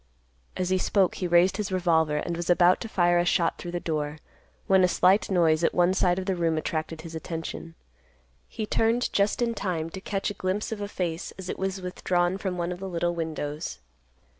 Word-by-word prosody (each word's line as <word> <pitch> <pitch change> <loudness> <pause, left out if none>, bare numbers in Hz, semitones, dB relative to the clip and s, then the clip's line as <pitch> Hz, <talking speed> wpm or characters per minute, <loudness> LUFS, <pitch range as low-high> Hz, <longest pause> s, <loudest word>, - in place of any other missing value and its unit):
As 185 0 -1
he 185 - +3
spoke 190 -1 +2
he 180 - -3
raised 175 +2 +4
his 210 -2 -3
revolver, 160 -4 +2
and 170 +3 -2
was 170 +1 -4
about 175 +1 +5
to 230 - -5
fire 175 -3 +3
a - - +3
shot 175 -1 +1
through 175 - -6
the 175 0 -3
door, 150 -2 -3 0.5
when 190 -1 +4
a - - +6
slight 185 +3 +3
noise 170 -3 +3
at - - +2
one 175 +1 +4
side 180 -2 +2
of 190 - -3
the 190 -1 0
room 165 -2 0
attracted 155 0 -3
his 165 0 -9
attention. 165 0 -6 0.7
He 220 - -4
turned 225 +3 +1
just 205 +4 +2
in 235 -1 0
time 170 -6 -3
to 190 - -7
catch 195 0 -2
a - - -5
glimpse 190 +3 -2
of 215 -2 -4
a 205 - -2
face 175 -4 -4
as 190 -1 -7
it - - -4
was 190 0 -3
withdrawn 180 0 0
from 190 -3 -3
one 175 0 -2
of 180 - -5
the 195 0 -5
little 175 0 -1
windows. 155 - -4
180 Hz, 215 wpm, -26 LUFS, 165-190 Hz, 0.7 s, a